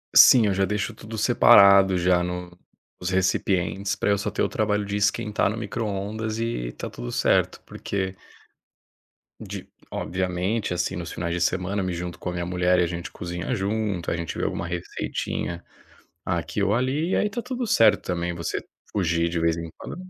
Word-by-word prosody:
Sim, 120 -4 +9
eu 100 - +2
já 95 - +2
deixo 105 +3 -2
tudo 110 +1 -8
separado 100 -4 +7
já 90 0 +3
no 90 0 -5 0.4
os 90 - -2
recipientes 95 +1 0
pra - - -1
eu 100 - +3
só 100 - -2
ter - - -2
o - - +2
trabalho 105 -1 0
de 100 0 -4
esquentar 105 0 +1
no 110 - -3
microondas 110 0 -3
e 115 - -2
tá - - -6
tudo - - -7
certo, - - +1
porque 95 -1 -4 1.2
de, - - -7 0.2
obviamente 90 +3 -2
assim 90 +2 -1
nos 85 -1 -5
finais 85 -1 -3
de 90 - -1
semana 95 +3 0
eu - - -2
me 90 - -2
junto 90 0 -5
com - - -4
a 90 - -4
minha 90 -1 -3
mulher 90 0 +2
e 90 - +4
a - - +1
gente 85 0 -5
cozinha 90 +7 -4
junto, 100 -3 -1
a - - -1
gente 85 0 -4
vê - - -2
alguma 85 - -2
receitinha 85 0 -4 0.6
aqui 85 +3 -2
ou 100 +1 +2
ali 135 +8 0
e - - +2
aí 210 - +1
tá 235 +4 -3
tudo 250 0 -3
certo 110 - +4
também 85 -1 -2
você 85 0 -3 0.3
fugir 85 -4 +1
de 85 -1 -1
vez 85 0 +2
em 85 -1 -6
quando - - -7
95 Hz, 190 wpm, -25 LUFS, 90-105 Hz, 1.2 s, Sim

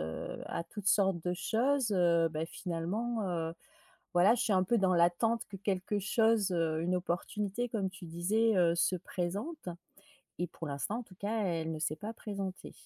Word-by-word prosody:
heu, 80 0 -4
à 170 - -3
toutes 200 +3 -3
sortes 195 -4 +3
de 180 - +1
choses, 230 +5 +1
heu, 170 -3 +4
bah, 155 0 -2
finalement, 200 +8 -2
heu, 165 -1 -2 0.6
voilà, 185 +6 +6
je 245 - 0
suis 220 - +1
un 185 -1 +4
peu 235 - +2
dans 185 -2 +3
l'attente 175 +7 +3
que 195 - -7
quelque 200 +1 -1
chose, 220 0 +3
heu, 165 -2 +1
une 180 +2 +1
opportunité 200 +6 -2
comme 200 -5 -1
tu 185 -2 -10
disais, 205 +7 +2
heu, 170 -2 +4
se 185 +2 +2
présente. 190 - -4 0.7
Et 175 - 0
pour 165 - -7
l'instant 145 +11 -2
en - - -6
tout 185 - -16
cas 210 +3 -1
elle 165 -3 -1
ne 155 - -4
s'est 155 0 -1
pas 215 +6 -5
présentée. 195 -4 -5
185 Hz, 185 wpm, -32 LUFS, 170-215 Hz, 0.7 s, voilà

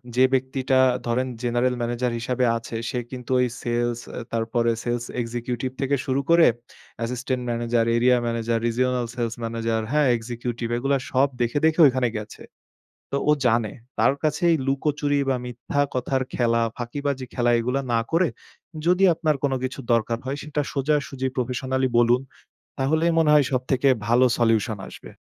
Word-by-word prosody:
যে 130 - +5
ব্যক্তিটা 130 0 +1 0.3
ধরেন 130 +2 0 0.2
জেনারেল 120 +1 +1
ম্যানেজার 120 +1 -1
হিসাবে 125 +1 0
আছে 115 0 -8
সে 125 - -2
কিন্তু 125 0 -7
ওই 125 - +3
সেলস 120 0 -1 0.2
এ - - -3
তারপরে 115 +1 +1
সেলস 120 0 -2 0.2
এক্সিকিউটিভ 120 +2 -3
থেকে 140 +1 +1
শুরু 135 +1 0
করে 170 0 +6 0.5
assistant 125 +2 -2
manager, 115 0 0
area 125 +1 +4
manager, 115 0 -1
regional 125 +1 0
sales 115 -2 -2
manager, 115 0 -1
হ্যাঁ 150 -2 +3
এক্সিকিউটিভ 120 0 -4
এগুলা 135 +3 +1
সব 135 +2 +4
দেখে, 120 +4 0
দেখে 160 +1 +2
ঐখানে 130 -2 +1
গেছে। 105 0 -8 0.7
তো 140 - 0
ও - - +7
জানে 115 -3 +2 0.3
তার - - +4
কাছেই 165 +2 +2
লুকোচুরি 145 +1 0
বা 130 - +2
মিথ্যা 125 +4 -2
কথার 130 +1 -1
খেলা, 115 -1 +2 0.2
ফাঁকিবাজি 135 +2 -3
খেলা 120 -1 +2
এগুলা 125 +4 -1
না 115 - +3
করে, 165 +1 +3 0.6
যদি 180 +2 +3
আপনার 155 -2 0
কোনো 135 -2 +1
কিছু 130 +2 -4
দরকার 115 0 +1
হয় 135 +2 -3
সেটা 150 0 -2
সোজাসুজি 140 -2 -1
প্রফেশনালই 130 +1 -1
বলুন 120 +2 +4 0.6
তাহলে 155 +5 +1
মনে 160 -2 +4
হয় 145 -3 +5
সবথেকে 130 +1 +1 0.2
ভালো 120 +2 +5
সলিউশন 115 -2 +1
আসবে। - - -12
125 Hz, 155 wpm, -24 LUFS, 120-135 Hz, 0.7 s, ও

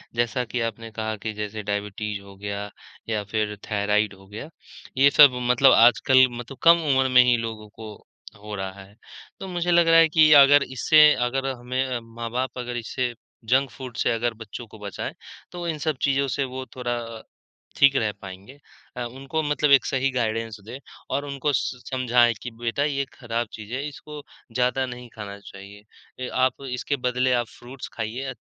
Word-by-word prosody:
जैसा 120 +1 0
कि 120 +1 -3
आपने 115 +1 -11
कहा 110 0 -3
कि 110 - -2
जैसे 105 0 -5
डायबिटीज़ 105 0 -4
हो 100 0 -14
गया 100 0 -5 0.4
या 105 -2 -1
फिर 105 -1 -1
थायराइड 105 0 +1
हो 95 0 -17
गया, 110 +10 -8 0.5
ये 140 +1 +6
सब 145 -2 +8 0.2
मतलब 130 +2 +6
आजकल 130 +2 +6
मतलब 120 +3 -8
कम 170 0 +7 0.2
उम्र 130 0 +2
में 125 - +9
ही 125 -1 +4
लोगों 110 -2 -6
को 110 -1 -10 0.5
हो 105 -1 -6
रहा 95 0 -6
है। 100 +2 -19 0.4
तो 190 - -7
मुझे 175 -1 -1
लग 170 -1 +4
रहा 165 0 +7
है 165 - +6
कि 155 0 +5
अगर 145 0 +5
इससे 150 +4 +5
अगर 135 +2 -2
हमें 125 +2 -2
अ, 125 -2 -3
माँ-बाप 115 +3 -5
अगर 120 -1 -4
इससे 120 +1 -3 0.4
जंक 135 +1 +3
फूड 130 -3 -9
से - - +1
अगर 115 0 -1
बच्चों 115 +3 -9
को 110 - -15
बचाएँ, 100 -1 -6 0.4
तो 175 -1 -6
इन 160 -2 -2
सब 150 -4 0
चीज़ों 140 0 +1
से 140 - +1
वो 130 0 -6
थोरा 120 -1 -2 0.8
ठीक 140 0 +5
रह 110 -4 +1
पाएँगे। 100 +8 -11 0.4
अ, 125 - -2
उनको 135 +6 -4
मतलब 150 0 +1
एक 135 - +6
सही 135 0 0
गाइडेंस 115 -2 -2
दें 125 +4 -8 0.4
और 140 - -2
उनको 140 +1 -2
स 125 -1 -3
समझाएँ 125 -2 +3
कि 125 - -6
बेटा 120 +5 -1
ये 140 -2 -1
ख़राब 120 -2 -3
चीज़ 110 +1 -9
है, 140 +3 -3
इसको 150 +1 -10 0.3
ज़्यादा 125 +1 +1
नहीं 125 -1 -8
खाना 100 -2 -7
चाहिए। 100 +1 -13 0.4
ए, 130 - -3
आप 130 +1 +1
इसके 125 +3 -2
बदले 125 +1 +1
आप 120 -2 0
फ्रूट्स 130 +2 -9
खाइए 125 +4 -4
125 Hz, 185 wpm, -24 LUFS, 110-135 Hz, 0.8 s, में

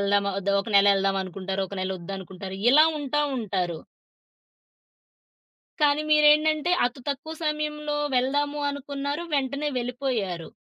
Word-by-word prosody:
ఎళ్దామా 200 0 +2
ఒద్దా? 200 0 -1
ఒక 215 - -8
నెల 200 0 +6
ఒళ్దాం 195 0 +1
అనుకుంటారు. 190 +1 -4
ఒక 200 - -8
నెలొద్దనుకుంటారు. 190 +1 -6
ఇలా 305 +3 +7
ఉంటా 290 +1 -1 0.2
ఉంటారు. 185 -7 -2 2.0
కానీ 295 0 +3
మీరేంటంటే 305 +2 +4
అతు 250 +2 -7
తక్కువ 310 +3 -4
సమయంలో 300 -1 -2 0.2
వెళ్దాము 285 +3 0
అనుకున్నారు. 285 +2 -4
వెంటనే 280 +2 -1
వెళ్ళిపోయారు. 240 - -3
260 Hz, 115 wpm, -25 LUFS, 195-295 Hz, 2.0 s, ఇలా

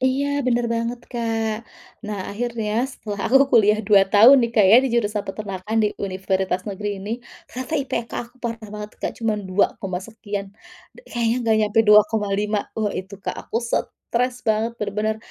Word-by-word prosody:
Iya, 260 +2 +1 0.2
bener 240 -1 +2
banget 230 +1 -2
Kak. 225 -1 -2 0.4
Nah, 210 -2 -4
akhirnya 225 -1 -3 0.2
setelah 210 -6 -7
aku 260 - +5 0.2
kuliah 215 -2 +5
2 200 -1 +6
tahun 225 +7 +8
nih 235 - 0
Kak 210 - +5
ya 220 - +9
di - - +1
jurusan 210 -3 +1
Peternakan 195 +1 -4
di - - +3
Universitas 190 -1 -1
Negeri 205 0 -4
ini, 200 +2 -7 0.3
ternyata 255 +5 -7
IPK 255 -4 -3
aku 240 +2 -21
parah 230 -3 -4
banget 210 0 -6
Kak, - - -1
cuman 215 -3 -1
dua 190 +2 +3
koma 185 -2 -3
sekian, 205 -1 -6 0.5
d - - -19
kayaknya 235 -1 0
enggak 220 -1 +3
sampai 225 +2 +3
2,5. 210 0 +3 0.2
Wah, 210 -2 0
itu 190 +2 -6
Kak - - -4
aku - - -3
stres 245 +1 -2
banget 220 +2 +1
bener-bener, 215 +1 -1
215 Hz, 170 wpm, -22 LUFS, 205-235 Hz, 0.5 s, ya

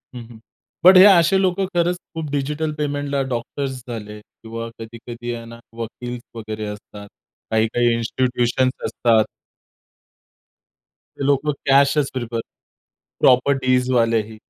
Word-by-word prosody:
हं, 120 - -6
हं. 110 -2 -13 0.4
बट 185 +1 +9
हे 185 - +10
असे 190 -1 +6
लोकं 190 +1 +1
खरंच 175 +1 +1 0.2
खूप 155 -3 -4
डिजिटल 150 +2 -2
पेमेंटला 145 -1 -2
डॉक्टर्स 130 +3 -4
झाले 105 -3 -7
किंवा 115 +2 -9
कधी-कधी 120 +1 -7
आहे 115 0 -7
ना 115 0 -11 0.2
वकील 120 +2 -6 0.2
वगैरे 110 -1 -5
असतात. 105 0 -9 0.4
काही-काही 115 +2 +2
इन्स्टिट्यूशन्स 125 +2 0
असतात. 115 -3 +2 1.9
ते 140 - -3
लोकं 145 +2 +2 0.2
कॅशच 140 +1 +4
प्रिफर 120 -2 -3 0.8
प्रॉपर्टीजवालेही. 125 -4 +2
125 Hz, 110 wpm, -21 LUFS, 115-145 Hz, 1.9 s, हे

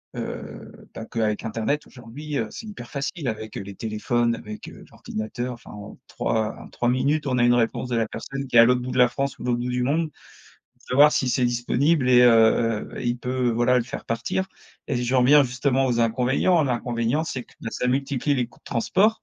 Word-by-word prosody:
heu, - - -7 0.2
bah, 115 - -7
que 115 - -5
avec 105 -1 0
internet 115 +7 -2
aujourd'hui, 140 +4 -7
heu, 110 - -1
c'est 225 - -8
hyper 155 - -9
facile 140 +2 -4
avec, 110 -1 -4
heu, - - -4
les 100 0 -9
téléphones, 115 +3 0
avec, 105 -2 -9
heu, - - -13
l'ordinateur, 120 +4 -5
enfin, 120 - -13
en 105 -1 -10
3 110 -1 -1
en - - -11
3 120 - -2
minutes, 140 +4 +1
on 125 -2 0
a 120 - +4
une 120 - +5
réponse 120 +1 0
de 120 - 0
la 115 - +1
personne 135 +4 -6
qui 125 - -5
est - - +9
à 115 - +9
l'autre 125 +1 +3
bout 125 - -5
de - - -3
la 125 -1 +6
France 135 +1 -3
ou - - -8
l'autre 120 -1 0
bout 125 +1 -3
du 125 0 -1
monde 155 +5 0 0.5
pour - - -34
savoir 145 +4 +6
si 130 - +1
c'est 125 0 +1
disponible 125 +4 +1
et 125 0 +7
heu, 115 -1 +4
il 120 0 -1
peut, 125 0 -1
voilà, 120 +2 +3
le 120 - -1
faire 125 - -7
partir 115 +11 -2 0.4
et 140 - 0
j'en 125 +1 +1
reviens 145 +4 +6
justement 130 +1 0
aux 120 -2 +1
inconvénients, 130 +9 +2
l'inconvénient, 120 +2 -1
c'est 130 -6 -5
que - - -23 0.2
ça 125 - -2
multiplie 135 +2 0
les 125 -3 0
coûts 115 - -23
de - - -59
transport, 200 - +1
125 Hz, 220 wpm, -24 LUFS, 115-135 Hz, 0.5 s, est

